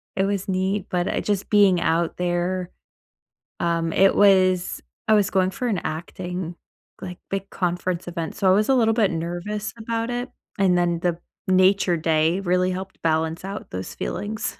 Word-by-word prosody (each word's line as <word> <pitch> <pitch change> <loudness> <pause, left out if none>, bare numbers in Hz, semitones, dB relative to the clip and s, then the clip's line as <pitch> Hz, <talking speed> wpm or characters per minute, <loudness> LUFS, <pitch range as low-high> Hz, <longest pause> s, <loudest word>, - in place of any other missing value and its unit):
It 195 - +1
was 200 -1 -2
neat. 190 +1 -1
But 180 0 0
I - - 0
just 205 -2 -2
being 200 -4 +5
out 165 +1 0
there, 180 +1 -1 0.9
um, 165 -1 0
it 195 0 +4
was 185 -3 +3 0.2
I 220 - +3
was 205 -2 +3
going 185 -1 +2
for 250 +5 -4
an 205 - 0
acting 175 +2 -5 0.5
like, 180 -1 -7
big 195 0 -3
conference 180 -1 -2
event, 170 -2 -4
so 195 - -1
I 185 - +6
was 210 +4 +2
a 270 - +5
little 225 -3 +3
bit 215 -4 +2
nervous 175 +6 -4
about 230 +1 -2
it, 245 +1 -3 0.3
and 185 -2 +3
then 175 -1 +1
the 175 -1 0 0.3
nature 185 -1 +4
day 160 +2 +1
really 180 -1 +1
helped 190 +1 -7
balance 160 +1 0
out 195 +2 -6
those 95 0 -6
feelings. 210 +1 -4
185 Hz, 175 wpm, -23 LUFS, 175-200 Hz, 0.9 s, I